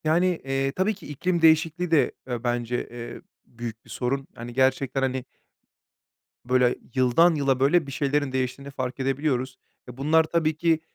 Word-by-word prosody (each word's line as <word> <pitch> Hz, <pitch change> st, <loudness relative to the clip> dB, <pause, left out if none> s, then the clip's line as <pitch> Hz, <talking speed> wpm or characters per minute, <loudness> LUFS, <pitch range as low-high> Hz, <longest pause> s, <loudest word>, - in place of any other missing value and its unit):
Yani, 170 Hz, +3 st, +2 dB
eee, 135 Hz, 0 st, 0 dB
tabii 190 Hz, +8 st, 0 dB
ki 185 Hz, -, -13 dB
iklim 170 Hz, +4 st, -1 dB
değişikliği 165 Hz, +2 st, +3 dB
de, 160 Hz, -, +4 dB, 0.2 s
eee, 120 Hz, -2 st, -4 dB
bence, 120 Hz, 0 st, -1 dB
eee, 120 Hz, 0 st, -8 dB, 0.2 s
büyük 115 Hz, -1 st, -8 dB
bir -, -, -19 dB
sorun. 135 Hz, +2 st, -2 dB
Hani 120 Hz, +1 st, -8 dB
gerçekten 130 Hz, +1 st, +1 dB
hani 130 Hz, -1 st, -1 dB, 1.2 s
böyle 125 Hz, 0 st, +3 dB, 0.2 s
yıldan 135 Hz, +7 st, +4 dB
yıla 135 Hz, -3 st, +1 dB
böyle 145 Hz, +3 st, +3 dB
bir -, -, -6 dB
şeylerin 145 Hz, 0 st, 0 dB
değiştiğini 130 Hz, +2 st, -3 dB
fark 130 Hz, -1 st, -4 dB
edebiliyoruz. 135 Hz, -1 st, -1 dB, 0.3 s
Ve 125 Hz, -, -10 dB
bunlar 155 Hz, +4 st, +4 dB
tabii 160 Hz, -1 st, 0 dB
ki, 165 Hz, -1 st, +2 dB
135 Hz, 160 wpm, -25 LUFS, 125-160 Hz, 1.2 s, de